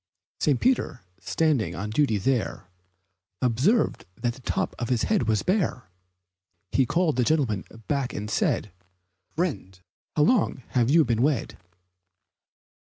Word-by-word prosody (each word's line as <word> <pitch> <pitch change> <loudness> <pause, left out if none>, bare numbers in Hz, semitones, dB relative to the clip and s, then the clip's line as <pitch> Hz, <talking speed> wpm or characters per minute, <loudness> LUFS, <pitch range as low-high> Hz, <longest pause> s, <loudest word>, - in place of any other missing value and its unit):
St. 145 -4 +2
Peter, 235 - +1 0.2
standing 135 - 0
on 105 +3 -4
duty 115 -3 +2
there, 110 -3 -1 0.7
Observed 130 - +1
that 120 -1 -2
the 130 - -15
top - - -1
of 120 - -3
his 125 -3 +1
head 210 - +1
was 110 -3 +1
bare. 170 - -1 0.8
He 130 -2 +2
called 170 -6 +1
the 125 - +3
gentleman 120 -9 +1 0.2
back 140 -3 -1
and 105 - -5
said, - - 0 0.6
"Friend, 140 - -3 0.4
how 150 - +4
long 175 - +2
have 120 -2 +2
you 160 +2 +5
been 115 -2 0
wed?" 140 -2 0
130 Hz, 135 wpm, -26 LUFS, 115-155 Hz, 0.8 s, you